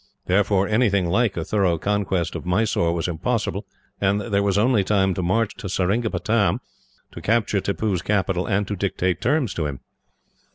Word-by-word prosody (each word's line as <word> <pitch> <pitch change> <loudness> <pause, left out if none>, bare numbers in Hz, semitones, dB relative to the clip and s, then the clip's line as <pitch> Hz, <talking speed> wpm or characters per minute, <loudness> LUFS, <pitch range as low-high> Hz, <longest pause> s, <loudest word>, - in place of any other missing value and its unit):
Therefore, 100 +1 +2
anything 105 -4 +2
like 100 +4 +1
a 80 - -2
thorough 95 -4 +1
conquest 95 -2 -1
of - - -5
Mysore 90 -2 +1
was 85 0 -1
impossible, 85 -3 -2 0.3
and 100 +1 +2
there 100 -1 0
was 100 -1 +1
only 110 -1 +3
time 95 -1 +2
to 95 - -3
march 105 +5 +1
to 110 -6 -6
Seringapatam, 105 +3 +1 0.5
to - - -9
capture 110 -3 +1
Tippoo's 100 -2 -1
capital, 95 -2 0
and 100 -1 0
to 105 - -3
dictate 95 -2 -1
terms 130 -4 +1
to 75 -3 -2
him. 70 -2 -6
100 Hz, 165 wpm, -23 LUFS, 90-105 Hz, 0.5 s, only